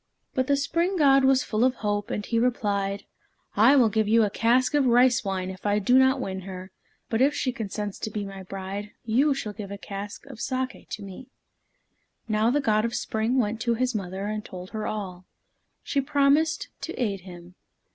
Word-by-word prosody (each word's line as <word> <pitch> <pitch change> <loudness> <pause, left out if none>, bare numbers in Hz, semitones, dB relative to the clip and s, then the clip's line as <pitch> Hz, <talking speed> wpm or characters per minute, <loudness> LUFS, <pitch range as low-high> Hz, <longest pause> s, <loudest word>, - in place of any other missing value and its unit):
But 260 -1 0
the 280 - +3
Spring 335 +7 0
God 275 -3 +5
was 265 -1 +4
full 215 +1 0
of 255 0 +3
hope, 205 0 -2
and 210 -4 -3
replied, 205 -4 0 0.5
"I 230 +7 +6
will 250 -5 +6
give 220 0 +1
you 225 +1 +5
a 205 - 0
cask 245 +5 +2
of 285 -3 +3
rice 245 0 +4
wine 190 -2 -2
if 185 - -11
I 205 0 +2
do 245 +5 +4
not 265 +1 +4
win 190 -6 -3
her, 185 0 -8 0.4
but 225 +1 0
if 285 +2 +4
she 255 - 0
consents 210 -3 -5
to - - -3
be 210 -1 -4
my 195 -1 -8
bride, 195 +2 -6
you 270 +6 +3
shall 215 -6 -4
give 205 -2 -7
a 200 - -6
cask 200 +4 -7
of 270 -5 -11
saké 255 +1 -3
to 210 - -6
me." 200 +6 -10 1.0
Now 215 +1 +2
the 285 +4 +2
God 215 -4 +2
of 235 +1 -2
Spring 225 +4 -1
went 225 -2 0
to 235 0 +1
his 255 +2 0
mother, 195 -1 -4
and 215 0 -3
told 180 -2 -9
her 215 -1 -3
all. 185 -4 -5 0.6
She 280 - 0
promised 290 +3 +2
to - - -5
aid 205 -6 -1
him. 175 -1 -12
220 Hz, 200 wpm, -26 LUFS, 200-255 Hz, 1.0 s, I